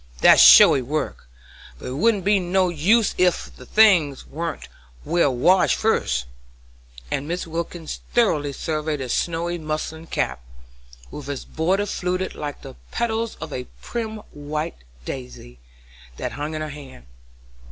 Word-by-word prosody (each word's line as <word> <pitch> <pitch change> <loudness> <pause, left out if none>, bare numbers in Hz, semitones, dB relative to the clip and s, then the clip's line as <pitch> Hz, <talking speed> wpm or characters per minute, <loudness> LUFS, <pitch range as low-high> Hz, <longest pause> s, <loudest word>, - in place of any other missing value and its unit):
That's - - +8
showy 135 - +9
work, 130 - -4 0.5
but - - -12
it 130 - -5
wouldn't 205 +1 +2
be 205 0 +4
no 185 +1 +1
use 200 +7 +2
ef 180 -1 +1
the - - -14
things 180 -11 +4
warn't 165 +1 -5 0.4
well 170 -5 +2
washed 170 +10 +3
fust," 65 - 0 0.9
and 140 +3 -2
Mrs. 175 +1 -2
Wilkins 165 0 -5 0.2
thoughtfully 155 -12 +2
surveyed 155 +1 -3
the 130 -2 -5
snowy 170 +4 -1
muslin 155 +1 -5
cap, 65 - -2 0.7
with 145 -1 -8
its 140 -2 -5
border 185 +6 0
fluted 185 -1 -2
like 145 -1 -6
the 135 - -9 0.2
petals 230 -1 -2
of 160 -2 -8
a 125 -1 -5
prim 220 -2 -5
white 150 +3 -5 0.3
daisy, 125 - -8 0.6
that - - -4
hung 150 +2 -5
on 155 - -4
her 155 - -4
hand. 140 - -11
160 Hz, 140 wpm, -22 LUFS, 145-185 Hz, 0.9 s, showy